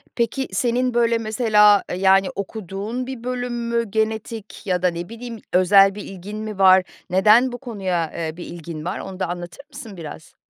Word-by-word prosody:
Peki, 240 +3 -1
senin, 245 +5 0
böyle, 235 -1 +3
mesela, 215 -2 +4
eee, - - -2
yani, 195 0 +4
okuduğun 205 +4 -5
bir 260 -3 -7
bölüm 245 -1 -3 0.2
mü 235 0 +1
genetik 220 -1 -3
ya 180 -2 0
da, 180 - +5
ne 170 +1 -4
bileyim, 230 0 -8
özel 195 +2 +5
bir 205 - -7
ilgin 195 +3 -8
mi 215 -2 -6
var 190 -1 +7 0.3
neden 215 +7 +5
bu 245 - -5
konuya, 190 -10 -3
eee, 160 -1 -4
bir 175 - -7
ilgin 165 -2 -8
var 180 +4 -3
onu 190 0 -8
da - - 0
anlatır 175 +9 -7
mısın 245 -8 -10
biraz? 160 -1 -10
210 Hz, 185 wpm, -22 LUFS, 185-235 Hz, 0.3 s, var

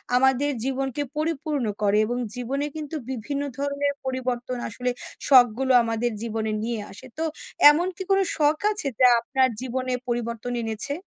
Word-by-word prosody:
আমাদের 265 +2 +3
জীবনকে 270 +1 -2 0.2
পরিপূর্ণ 305 -3 -1 0.2
করে 205 0 +3
এবং 245 +2 -2 0.2
জীবনে 265 +4 -2
কিন্তু 310 0 -5
বিভিন্ন 265 +3 -3 0.2
ধরনের 285 0 -1
পরিবর্তন 255 -1 -2
আসলে 250 +3 -3 0.4
শখগুলো 255 0 +5
আমাদের 230 +1 -1
জীবনে 220 -1 -2
নিয়ে 230 0 -2
আসে। 195 - -11
তো 320 - -1 0.5
এমন 345 +5 0
কি - - -8
কোন 390 - +5 0.2
শখ 300 0 +3
আছে 420 -8 0
যা 255 - +7
আপনার 260 +2 +2
জীবনে 255 0 -2
পরিবর্তন 235 0 -3
এনেছে? 225 +5 -1
255 Hz, 145 wpm, -25 LUFS, 235-285 Hz, 0.5 s, যা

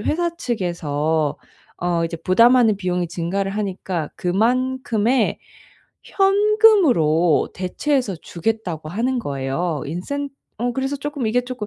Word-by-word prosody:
회사 340 +8 -1
측에서 160 - -1 0.4
어 175 -1 0
이제 165 0 -4
부담하는 230 +5 +4
비용이 180 -2 -2
증가를 180 +4 -2
하니까 190 -5 -3
그만큼의 240 +3 +1 0.6
현금으로 390 - +3
대체해서 225 +5 -1
주겠다고 170 -2 -4
하는 245 +7 -1
거예요. 140 - -2
인센 280 - -4 0.3
어 245 +2 0
그래서 270 +2 -2
쪼끔 285 -3 -4
이게 235 +3 +2
쪼끔 245 -4 -6
210 Hz, 280 characters per minute, -21 LUFS, 170-260 Hz, 0.6 s, 부담하는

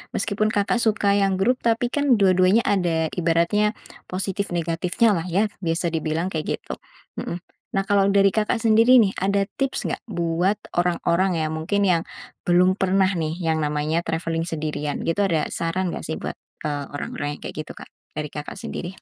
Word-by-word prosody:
Meskipun 205 +2 0
Kakak 205 +4 +1
suka 205 -2 +2
yang 195 -2 +2
grup, 245 +6 +3
tapi 235 +1 +2
kan 275 -3 +2
dua-duanya 185 +3 +4
ada 170 -5 +1
ibaratnya 175 +5 +2 0.4
positif, 195 +1 -2
negatifnyalah 175 +3 +1
ya 205 +5 +2 0.2
bisa 165 +1 0
dibilang 160 +2 -1
kayak 155 -1 -2
gitu, - - -7 0.5
mhm. 175 - -4 0.4
Nah, 195 - +2
kalau 195 0 +3
dari 195 0 +4
Kakak 220 +1 0
sendiri 230 +3 +6
nih, 195 - +1
ada 200 +1 +2 0.2
tips 270 -1 -1
nggak - - -2
buat 175 0 0 0.2
orang-orang 180 +1 +1
yang 155 - -2
mungkin 200 +5 0
yang 180 -3 +2 0.4
belum 180 +2 +4
pernah 190 0 +3
nih 160 -3 -2
yang 165 -3 0
namanya 150 +2 0
traveling 165 0 -2
sendirian 150 -2 -3
gitu. 165 +4 -1
Ada 160 -5 0
saran 170 +2 -1
nggak - - -5
sih 160 - -2
buat, - - -6 0.2
eee, 145 -2 -2
orang-orang 145 0 -4
yang - - -16
kayak - - -6
gitu, - - -7
Kak, - - -12 0.2
dari 150 -1 -4
Kakak 150 -1 -6
sendiri? 180 +2 -6
185 Hz, 170 wpm, -23 LUFS, 165-200 Hz, 0.5 s, sendiri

